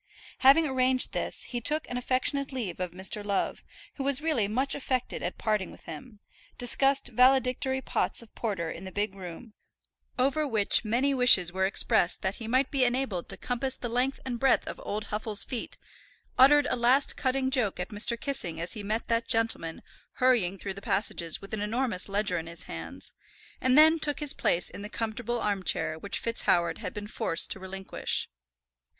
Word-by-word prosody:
Having 275 Hz, +5 st, +6 dB
arranged 260 Hz, -2 st, +2 dB
this -, -, -3 dB
he 240 Hz, -1 st, -5 dB
took 305 Hz, +6 st, +1 dB
an 245 Hz, -, -6 dB
affectionate 260 Hz, +3 st, +2 dB
leave 225 Hz, -11 st, -4 dB
of 180 Hz, -1 st, -2 dB
Mr. 190 Hz, +4 st, -2 dB
Love, 200 Hz, -1 st, -2 dB, 0.3 s
who 275 Hz, -, -3 dB
was 275 Hz, -1 st, +3 dB
really 300 Hz, -10 st, 0 dB
much 255 Hz, +6 st, 0 dB
affected 255 Hz, -3 st, -2 dB
at -, -, -4 dB
parting 210 Hz, -4 st, -1 dB
with -, -, -14 dB
him, 205 Hz, +8 st, -10 dB, 0.4 s
discussed 270 Hz, +3 st, +2 dB
valedictory 260 Hz, +1 st, +3 dB
pots -, -, 0 dB
of 225 Hz, -, -19 dB
porter 190 Hz, -8 st, -3 dB
in -, -, -8 dB
the 190 Hz, -, -8 dB
big 205 Hz, 0 st, -2 dB
room, 195 Hz, +4 st, -10 dB, 0.6 s
over 280 Hz, +4 st, +1 dB
which 220 Hz, -4 st, +2 dB
many 245 Hz, +6 st, +1 dB
wishes 240 Hz, -10 st, +5 dB
were 190 Hz, 0 st, +1 dB
expressed 180 Hz, -2 st, +3 dB
that 190 Hz, +1 st, -2 dB
he 225 Hz, -, -7 dB
might 260 Hz, +3 st, +1 dB
be 275 Hz, -2 st, +2 dB
enabled 245 Hz, -7 st, -1 dB
to -, -, +1 dB
compass 255 Hz, +1 st, -2 dB
the 240 Hz, -, -4 dB
length 250 Hz, +3 st, -1 dB
and 245 Hz, -2 st, -4 dB
breadth 270 Hz, +1 st, +3 dB
of -, -, -7 dB
old 210 Hz, 0 st, -4 dB
Huffle's 210 Hz, -1 st, 0 dB
feet, 245 Hz, -3 st, -5 dB, 0.6 s
uttered 290 Hz, +3 st, +6 dB
a -, -, +1 dB
last 250 Hz, +4 st, +3 dB
cutting 260 Hz, 0 st, 0 dB
joke 240 Hz, -9 st, 0 dB
at 180 Hz, -, -4 dB
Mr. 220 Hz, +2 st, +2 dB
Kissing 175 Hz, -, -2 dB
as 170 Hz, +1 st, 0 dB
he 215 Hz, -, -6 dB
met 215 Hz, +3 st, -3 dB
that 230 Hz, 0 st, 0 dB
gentleman 225 Hz, -8 st, 0 dB, 0.3 s
hurrying 235 Hz, -8 st, +2 dB
through 195 Hz, 0 st, -5 dB
the 195 Hz, -, -10 dB
passages 170 Hz, -5 st, 0 dB
with 195 Hz, -, -11 dB
an 215 Hz, -, -2 dB
enormous 215 Hz, -3 st, -1 dB
ledger 195 Hz, -3 st, 0 dB
in 165 Hz, -, -8 dB
his 170 Hz, +1 st, -5 dB
hands, -, -, -8 dB, 0.5 s
and 255 Hz, +1 st, +3 dB
then 315 Hz, +2 st, +7 dB
took 295 Hz, -1 st, 0 dB
his 295 Hz, -2 st, -1 dB
place 175 Hz, -, 0 dB
in -, -, -6 dB
the 210 Hz, -, -7 dB
comfortable 235 Hz, +2 st, -3 dB
arm 205 Hz, -3 st, -1 dB
chair 160 Hz, -3 st, -1 dB
which 200 Hz, +4 st, -4 dB
FitzHoward 180 Hz, -7 st, 0 dB
had 195 Hz, -5 st, -5 dB
been 205 Hz, 0 st, -5 dB
forced 170 Hz, -4 st, -1 dB
to -, -, -3 dB
relinquish. 190 Hz, 0 st, -2 dB
230 Hz, 190 wpm, -28 LUFS, 195-260 Hz, 0.6 s, then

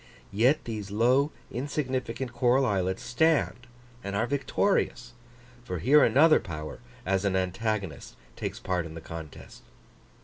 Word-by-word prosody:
Yet 125 Hz, +9 st, +3 dB
these 105 Hz, -4 st, -5 dB
low, 125 Hz, +8 st, +3 dB, 0.2 s
insignificant 130 Hz, -2 st, -3 dB
coral 125 Hz, +2 st, +3 dB
islets 95 Hz, -4 st, -1 dB
stand 135 Hz, -2 st, +1 dB, 0.4 s
and 100 Hz, 0 st, -4 dB
are 110 Hz, +3 st, +1 dB
victorious: 130 Hz, -3 st, 0 dB, 0.5 s
for 90 Hz, -6 st, -4 dB
here 140 Hz, -, +5 dB
another 155 Hz, +3 st, +6 dB
power, 75 Hz, -7 st, -7 dB, 0.3 s
as 95 Hz, +1 st, +1 dB
an 100 Hz, -2 st, +1 dB
antagonist, 95 Hz, -1 st, -2 dB, 0.2 s
takes -, -, -5 dB
part 90 Hz, -3 st, -2 dB
in 80 Hz, -, -10 dB
the -, -, -6 dB
contest. 80 Hz, -2 st, -10 dB
115 Hz, 130 wpm, -28 LUFS, 95-130 Hz, 0.5 s, another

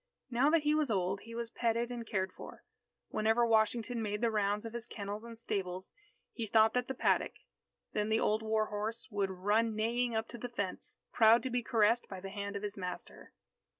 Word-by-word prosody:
Now 250 Hz, +5 st, +4 dB
that 320 Hz, -1 st, +3 dB
he 300 Hz, 0 st, +3 dB
was 305 Hz, -3 st, +2 dB
old, 195 Hz, -2 st, 0 dB
he 230 Hz, 0 st, -9 dB
was 235 Hz, -1 st, -3 dB
petted 235 Hz, 0 st, 0 dB
and 235 Hz, -2 st, -5 dB
cared 190 Hz, -3 st, -1 dB
for. -, -, -11 dB, 0.5 s
Whenever 225 Hz, +2 st, +2 dB
Washington 225 Hz, +1 st, +2 dB
made 210 Hz, -1 st, -2 dB
the 235 Hz, -1 st, +2 dB
rounds 210 Hz, 0 st, 0 dB
of 225 Hz, -, -6 dB
his 235 Hz, -1 st, -5 dB
kennels 205 Hz, +1 st, -5 dB
and 230 Hz, -1 st, -8 dB
stables, 190 Hz, -4 st, -3 dB, 0.4 s
he 230 Hz, -2 st, -3 dB
stopped 220 Hz, +2 st, +4 dB
at 250 Hz, 0 st, +1 dB
the 265 Hz, -, -3 dB
paddock. -, -, +2 dB, 0.6 s
Then 210 Hz, 0 st, 0 dB
the 220 Hz, +1 st, +3 dB
old 215 Hz, +1 st, +2 dB
war 220 Hz, 0 st, +1 dB
horse 215 Hz, +2 st, -4 dB
would 200 Hz, -2 st, 0 dB
run 210 Hz, +4 st, +1 dB
neighing 235 Hz, +2 st, 0 dB
up 220 Hz, 0 st, -1 dB
to 240 Hz, -, -8 dB
the 245 Hz, -, -5 dB
fence, 200 Hz, -6 st, -4 dB, 0.2 s
proud 225 Hz, +1 st, +6 dB
to 260 Hz, -, -3 dB
be 245 Hz, 0 st, +1 dB
caressed 230 Hz, 0 st, +2 dB
by 190 Hz, -, -6 dB
the 195 Hz, +1 st, -7 dB
hand 200 Hz, 0 st, -4 dB
of 200 Hz, -, -4 dB
his 205 Hz, -1 st, -3 dB
master. 180 Hz, -2 st, -7 dB
220 Hz, 210 wpm, -33 LUFS, 205-235 Hz, 0.6 s, proud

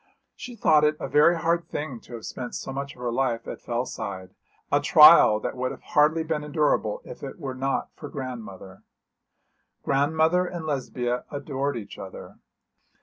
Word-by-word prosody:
She 245 Hz, -1 st, -9 dB
thought 155 Hz, -8 st, +4 dB
it 150 Hz, 0 st, +2 dB
a -, -, -4 dB
very 160 Hz, +4 st, +4 dB
hard 170 Hz, 0 st, 0 dB
thing 140 Hz, -5 st, -5 dB
to 120 Hz, -, -15 dB
have 115 Hz, -, -9 dB
spent 125 Hz, -1 st, -6 dB
so 135 Hz, -, -5 dB
much 140 Hz, +1 st, -5 dB
of 125 Hz, -, -14 dB
her 120 Hz, -1 st, -2 dB
life 120 Hz, -2 st, -1 dB
at -, -, -7 dB
Fellside, 100 Hz, -6 st, -5 dB, 0.4 s
a 145 Hz, -, +4 dB
trial 150 Hz, -8 st, +8 dB
that -, -, -4 dB
would 130 Hz, 0 st, -2 dB
have -, -, -9 dB
hardly 155 Hz, +2 st, +2 dB
been 155 Hz, -2 st, -2 dB
endurable 155 Hz, -, 0 dB
if -, -, -10 dB
it -, -, -7 dB
were 140 Hz, -6 st, -5 dB
not 135 Hz, +1 st, -2 dB
for 145 Hz, -, -9 dB
grandmother. 110 Hz, -8 st, -8 dB, 1.0 s
Grandmother 160 Hz, +6 st, +2 dB
and 175 Hz, -3 st, -6 dB
Lesbia 125 Hz, -4 st, -2 dB
adored 140 Hz, -2 st, -3 dB
each 105 Hz, -, -9 dB
other. 95 Hz, -1 st, -10 dB
140 Hz, 170 wpm, -25 LUFS, 125-155 Hz, 1.0 s, trial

